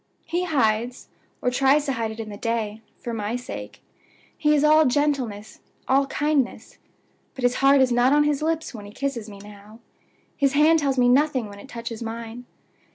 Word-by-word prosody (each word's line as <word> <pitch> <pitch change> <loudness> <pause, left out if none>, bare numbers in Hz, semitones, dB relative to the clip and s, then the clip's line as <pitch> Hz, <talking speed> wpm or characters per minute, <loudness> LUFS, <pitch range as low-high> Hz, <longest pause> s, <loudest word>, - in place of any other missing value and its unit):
He 350 +3 -1
hides, 245 -6 0 0.3
or 250 - +2
tries 275 +3 +3
to 275 - -1
hide, 230 -3 -2
it 220 +1 -8
in 220 -1 -5
the 205 - -7
day, 220 -1 -3 0.2
for 235 - -6
my 215 +1 -3
sake. 245 0 -8 0.5
He 300 0 +2
is 290 - +2
all 305 0 +5
gentleness, 255 -7 -1 0.3
all 275 +1 +3
kindness; 290 -2 -1 0.6
but 260 - -7
his 245 0 +2
heart 275 0 +6
is 255 -1 +3
not 245 +2 +3
on 295 +1 +4
his 295 -1 0
lips 320 -1 -2
when 210 -3 -9
he - - -11
kisses 245 -5 -4
me 200 - -11
now; 205 +1 -14 0.6
his 275 -2 +1
hand 310 +3 +5
tells 275 -3 0
me 245 -1 +4
nothing 260 -3 +2
when 200 0 -11
it 270 - -13
touches 230 -2 -7
mine. 230 +1 -6
250 Hz, 190 wpm, -24 LUFS, 225-285 Hz, 0.6 s, heart